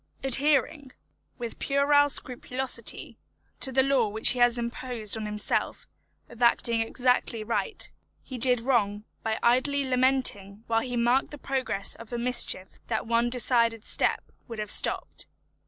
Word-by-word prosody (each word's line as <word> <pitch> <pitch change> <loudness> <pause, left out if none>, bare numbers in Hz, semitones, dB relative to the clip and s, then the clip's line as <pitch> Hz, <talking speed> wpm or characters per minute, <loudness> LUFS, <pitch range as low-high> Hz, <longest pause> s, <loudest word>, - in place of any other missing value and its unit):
Adhering, 275 +1 +2 0.4
with 235 -2 -7
puerile 285 +1 +3
scrupulosity, 250 -2 -3 0.4
to 265 - +1
the 265 +1 +3
law 265 -4 +2
which 220 +2 +4
he 250 - 0
has 240 0 +4
imposed 235 -2 -3
on 220 -1 -5
himself, 210 0 -2 0.4
of 235 0 -15
acting 235 -1 +3
exactly 245 -1 0
right, 235 - -2 0.3
he 255 -3 -8
did 250 -1 +4
wrong 210 -5 0 0.2
by 220 0 -2
idly 270 +4 +2
lamenting 255 -6 0
whilst 225 +2 0
he 245 -1 -3
marked 240 +3 +2
the 295 - -8
progress 260 -8 -2
of 230 0 -13
a 240 - -3
mischief 235 -6 +1
that 220 -2 -2
one 235 +1 +1
decided 235 -2 +1
step - - 0 0.2
would 230 -3 -8
have 210 -1 -4
stopped. - - -2
240 Hz, 145 wpm, -26 LUFS, 225-260 Hz, 0.4 s, which